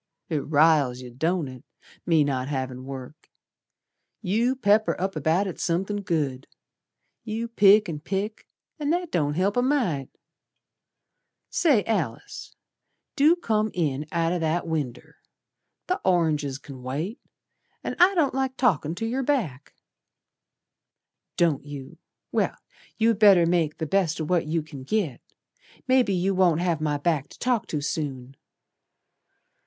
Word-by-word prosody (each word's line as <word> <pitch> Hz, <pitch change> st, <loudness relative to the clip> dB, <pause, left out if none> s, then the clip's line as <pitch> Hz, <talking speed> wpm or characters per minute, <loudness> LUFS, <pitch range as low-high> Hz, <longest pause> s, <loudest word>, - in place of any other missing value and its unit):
"It 155 Hz, -3 st, 0 dB
riles 145 Hz, -4 st, +3 dB
yer, 125 Hz, -, -9 dB
don't 160 Hz, +5 st, -1 dB
it, 130 Hz, -1 st, -10 dB, 0.4 s
me 160 Hz, -3 st, +4 dB
not 130 Hz, -2 st, -1 dB
havin' 130 Hz, -2 st, -4 dB
work. 135 Hz, +2 st, -9 dB, 0.9 s
You 230 Hz, +7 st, +1 dB
pepper 215 Hz, -3 st, +2 dB
up 190 Hz, 0 st, -2 dB
about 160 Hz, +6 st, +1 dB
it 185 Hz, -, -6 dB
somethin' 190 Hz, +4 st, -1 dB
good. 145 Hz, -8 st, -2 dB, 0.8 s
You 225 Hz, +1 st, -3 dB
pick 210 Hz, -2 st, +5 dB
an' 155 Hz, -3 st, -4 dB
pick, 200 Hz, +7 st, -4 dB, 0.3 s
and 295 Hz, 0 st, 0 dB
that 350 Hz, -1 st, -1 dB
don't 150 Hz, -3 st, 0 dB
help 195 Hz, +6 st, +1 dB
a -, -, +4 dB
mite. 240 Hz, -, 0 dB, 1.4 s
Say, 280 Hz, -, +3 dB
Alice, 170 Hz, -, -3 dB, 0.6 s
do 310 Hz, +3 st, +5 dB
come 220 Hz, -10 st, 0 dB
in 150 Hz, -4 st, -1 dB
out 165 Hz, 0 st, +1 dB
o' 180 Hz, -, -1 dB
that 165 Hz, +1 st, 0 dB
winder. 150 Hz, -7 st, -4 dB, 0.7 s
Th' 365 Hz, -, 0 dB
oranges 155 Hz, -7 st, +1 dB
c'n 135 Hz, -1 st, -11 dB
wait, 150 Hz, -, -4 dB, 0.6 s
An' -, -, -3 dB
I 375 Hz, +2 st, +6 dB
don't 300 Hz, -7 st, +2 dB
like 265 Hz, 0 st, -1 dB
talkin' 170 Hz, -, +1 dB
to 225 Hz, -, -3 dB
yer 250 Hz, +4 st, -1 dB
back." 210 Hz, -, -2 dB, 1.6 s
"Don't 165 Hz, -5 st, +2 dB
you! 140 Hz, -2 st, -9 dB, 0.3 s
Well, -, -, 0 dB, 0.4 s
you'd 225 Hz, -2 st, +2 dB
better 195 Hz, -5 st, +7 dB
make 165 Hz, -3 st, +1 dB
the 160 Hz, -, -3 dB
best 170 Hz, 0 st, +1 dB
o' -, -, -1 dB
what 170 Hz, 0 st, 0 dB
you 160 Hz, 0 st, 0 dB
can 150 Hz, -3 st, -10 dB
git. 155 Hz, -, -2 dB, 0.7 s
Maybe 255 Hz, -6 st, +3 dB
you 185 Hz, +2 st, +1 dB
won't 180 Hz, -4 st, +3 dB
have 170 Hz, -4 st, 0 dB
my 150 Hz, -1 st, 0 dB
back 145 Hz, -1 st, -1 dB
to -, -, -15 dB
talk 245 Hz, -4 st, 0 dB
to 150 Hz, -, -3 dB
soon. 135 Hz, -3 st, -4 dB
170 Hz, 140 wpm, -25 LUFS, 145-215 Hz, 1.6 s, better